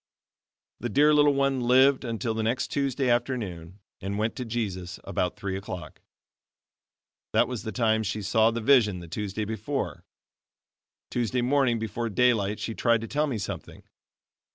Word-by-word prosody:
The 120 - -3
dear 145 +6 +4
little 145 -1 +5
one 140 -1 +1
lived 130 +3 +4
until 115 -1 -2
the 110 - -2
next 115 +4 -1
Tuesday 140 -2 0
afternoon, 105 -8 -2 0.2
and 100 +1 -3
went 110 +2 -1
to 125 - -3
Jesus 95 -6 -4
about 90 - -2
three 95 -1 -4
o'clock. 95 -2 -7 1.3
That 120 - +4
was 125 -3 -4
the 110 - -5
time 110 -2 +2
she 105 0 -3
saw 110 +3 +3
the 115 0 -3
vision 110 -6 +4
the 85 - -10
Tuesday 105 +4 -3
before. 110 +6 -3 1.1
Tuesday 120 +1 0
morning 130 -2 +2
before 115 +1 -3
daylight 105 -2 +2
she 115 - -3
tried 115 -1 +2
to 115 - -5
tell 150 +4 0
me 130 -6 -2
something. 100 - -6
115 Hz, 155 wpm, -27 LUFS, 105-125 Hz, 1.3 s, little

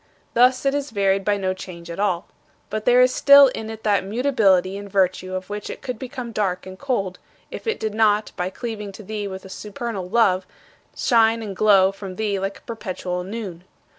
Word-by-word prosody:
Thus, 255 +3 +4
it 275 - +3
is 285 0 -2
varied 195 -2 +1
by 205 +1 +1
no 190 -1 -1
change 180 -3 -9
at 170 - -7
all. 190 -3 0 0.5
But 215 0 -3
there 245 +1 +6
is 255 0 +3
still 280 -1 +8
in 220 -3 -6
it 220 0 -8
that 205 -2 +2
mutability 195 -5 +2
in 200 0 -7
virtue 185 -1 0
of 185 0 -5
which 205 0 -6
it - - -8
could 250 -4 -4
become 255 -2 -6
dark 190 -5 -1
and 190 0 -10
cold, 200 -10 -2 0.3
if - - -8
it 450 - -1
did 220 -1 -2
not, 215 -1 +2
by 180 +1 -2
cleaving 210 -1 -6
to 215 - -10
thee 210 0 -4
with 190 -1 -7
a - - -8
supernal 205 -1 -6
love, 190 -4 +2 0.5
shine 230 -1 +3
and 200 -3 -6
glow 195 -1 +5
from 195 -1 -8
thee 205 -1 -1
like 195 +1 -3
a - - -20
perpetual 185 -5 -4
noon. 190 -4 -6
205 Hz, 205 wpm, -22 LUFS, 190-230 Hz, 0.5 s, still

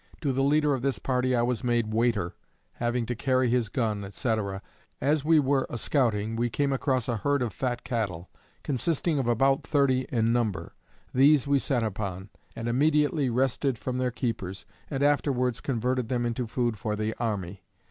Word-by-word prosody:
To 140 -4 0
the 135 - 0
leader 150 +1 +3
of 130 - -2
this 135 0 0
party 130 -1 0
I 120 - +2
was 120 -3 -1
made 120 -3 0
waiter, 110 -6 +1 0.4
having 120 0 0
to 120 - -2
carry 130 +1 +1
his 120 -3 +1
gun, 105 -5 -2
&c. 110 +4 0 0.6
As 145 +2 +1
we 160 +1 +5
were 135 -1 +1
a - - -4
scouting 115 -5 0
we 120 +1 0
came 140 +4 0
across 130 -2 0
a 120 -2 0
herd 140 +4 +1
of 115 -5 -3
fat 120 -2 -2
cattle, 105 -9 -3 0.4
consisting 150 +3 0
of 130 - -1
about 135 +4 +3
thirty 130 -3 +1
in 115 -1 +1
number. 105 -9 -1 0.4
These 140 +1 +5
we 140 0 +3
set 130 -3 0
upon, 100 -2 -4 0.3
and 115 0 -4
immediately 145 +2 +2
wrested 130 +1 0
from 125 +2 -3
their 130 0 +1
keepers, 115 -6 -4 0.2
and 140 -2 -1
afterwards 130 -4 +1
converted 125 -1 -1
them 120 -2 0
into 120 +1 -2
food 120 -2 -1
for 105 +1 -2
the 110 +1 -2
army. 100 -5 -3
125 Hz, 180 wpm, -27 LUFS, 115-135 Hz, 0.6 s, we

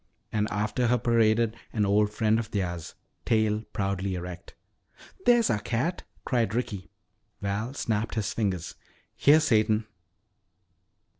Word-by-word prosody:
And 105 0 0
after 105 +4 0
her 125 +1 +3
paraded 115 -1 +2 0.2
an 105 -2 +1
old 105 +1 +3
friend 110 +1 +2
of 115 - -4
theirs, 85 -5 -3 0.3
tail 110 -1 +2
proudly 95 -1 -1
erect. 90 0 -7 0.7
"There's 240 -2 +5
our 105 - +1
cat!" 125 - -1 0.2
cried 115 -5 0
Ricky. 100 -7 -3 0.5
Val 105 +6 -3
snapped 110 -4 -1
his 105 -3 -1
fingers. 95 -6 -2 0.4
"Here, 150 +2 +6
Satan." 110 -6 +2
110 Hz, 125 wpm, -27 LUFS, 100-115 Hz, 0.7 s, Here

